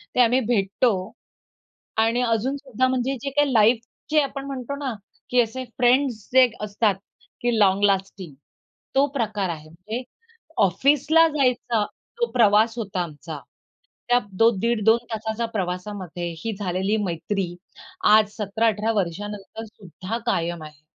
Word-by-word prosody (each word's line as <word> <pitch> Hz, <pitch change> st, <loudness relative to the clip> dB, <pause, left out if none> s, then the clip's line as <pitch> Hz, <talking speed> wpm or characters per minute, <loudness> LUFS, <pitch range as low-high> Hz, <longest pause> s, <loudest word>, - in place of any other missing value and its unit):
ते -, -, +1 dB
आम्ही 245 Hz, +2 st, +4 dB
भेटतो 215 Hz, +2 st, +2 dB, 1.1 s
आणि 230 Hz, +2 st, +1 dB
अजून 240 Hz, +3 st, 0 dB
सुद्धा 255 Hz, -2 st, -1 dB
म्हणजे 260 Hz, +1 st, 0 dB
जे 275 Hz, -, -2 dB
काही 285 Hz, 0 st, +1 dB
लाईफचे 235 Hz, +7 st, +2 dB
आपण 275 Hz, 0 st, -4 dB
म्हणतो 275 Hz, 0 st, -5 dB
ना 275 Hz, -4 st, -3 dB, 0.4 s
की 250 Hz, 0 st, +4 dB
असे 240 Hz, +3 st, -3 dB
फ्रेंड्स 250 Hz, -3 st, +2 dB
जे 260 Hz, -1 st, +7 dB
असतात 210 Hz, -1 st, +1 dB, 0.5 s
की 240 Hz, -2 st, +1 dB
लाँग 195 Hz, 0 st, +4 dB
लास्टिंग 195 Hz, -4 st, -1 dB, 0.6 s
तो 275 Hz, -, +5 dB
प्रकार 210 Hz, -6 st, -1 dB
आहे. 155 Hz, -2 st, -5 dB
म्हणजे 210 Hz, +9 st, -6 dB, 0.6 s
ऑफिसला 285 Hz, -, +4 dB
जायचा 250 Hz, -6 st, +1 dB, 0.4 s
जो 475 Hz, -, +2 dB
प्रवास 225 Hz, 0 st, +4 dB
होता 195 Hz, -5 st, -2 dB
आमचा 155 Hz, -1 st, -8 dB, 0.7 s
त्या 245 Hz, 0 st, +5 dB
दो 225 Hz, +5 st, +4 dB
दीड 230 Hz, 0 st, 0 dB
2 225 Hz, +1 st, +6 dB, 0.2 s
तासाच्या 220 Hz, +1 st, -2 dB
प्रवासामध्ये 180 Hz, -2 st, -4 dB
ही 225 Hz, -2 st, -2 dB
झालेली 190 Hz, +2 st, 0 dB
मैत्री 175 Hz, +1 st, -3 dB, 0.6 s
आज 215 Hz, -1 st, +4 dB
17-18 215 Hz, +1 st, 0 dB
वर्षानंतर 205 Hz, +3 st, -4 dB
सुद्धा 205 Hz, 0 st, -7 dB
कायम 170 Hz, -7 st, -1 dB
आहे. 150 Hz, -2 st, -12 dB
220 Hz, 130 wpm, -23 LUFS, 195-250 Hz, 1.1 s, जे